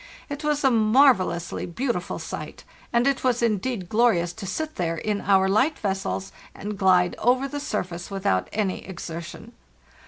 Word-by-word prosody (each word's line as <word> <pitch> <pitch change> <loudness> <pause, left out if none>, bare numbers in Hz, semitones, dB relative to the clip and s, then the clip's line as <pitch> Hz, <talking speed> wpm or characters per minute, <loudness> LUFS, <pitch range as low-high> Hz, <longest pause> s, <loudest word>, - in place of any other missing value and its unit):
It 285 +1 -5
was 295 -1 0
a 265 - +5
marvellously 215 -8 +3
beautiful 180 0 -2
sight, - - -7 0.3
and 235 +1 +3
it 275 -1 +1
was 245 -2 +1
indeed 215 -2 -1
glorious 195 -6 +2
to 195 +1 -7
sit 310 +11 -3
there 165 -2 -1
in 210 +3 -2
our 190 -1 +4
light 260 +11 +2
vessels 95 - -2 0.2
and 210 +1 -5
glide 180 -2 +3
over 255 +3 +2
the 290 +1 -5
surface 180 -9 -4
without 185 - 0
any 205 -3 -1
exertion. 170 -3 -7
205 Hz, 155 wpm, -25 LUFS, 180-255 Hz, 0.3 s, a